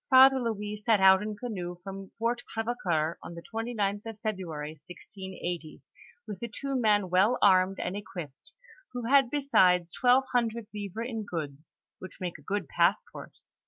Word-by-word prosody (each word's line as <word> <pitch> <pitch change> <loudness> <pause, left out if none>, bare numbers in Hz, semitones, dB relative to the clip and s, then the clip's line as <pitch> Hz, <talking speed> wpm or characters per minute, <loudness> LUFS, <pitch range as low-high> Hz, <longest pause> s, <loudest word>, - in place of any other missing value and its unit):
Father 265 0 +8
Louis 210 -3 -3
set 215 0 +2
out 190 0 +7
in 210 0 -4
canoe 185 -7 -5
fj 175 - -29
om 195 0 -7
Fort 235 +1 0
Crevecoeur 185 -9 -1
on 170 - -9
the 170 - -9
29th 220 -3 -2
of 225 -2 -7
February, 160 -8 -4
1680, 180 -3 -7 0.4
with 210 -3 -7
two 275 +3 -3
men 210 -6 +2
well 200 +7 +4
armed 190 -1 +4
and 180 +2 -3
equip 180 -7 -6
ped, 135 - -23 0.4
who 245 -2 -4
had 270 0 +5
besides 180 - +3
twelve 255 +1 +4
himdred 235 -2 0
livres 210 +2 -4
in 225 -3 -4
goods, 155 -6 -6 0.2
which 185 - -10
make 180 -3 -4
a - - -16
good 200 -5 -3
passport. 175 +7 0
205 Hz, 160 wpm, -29 LUFS, 180-230 Hz, 0.4 s, Father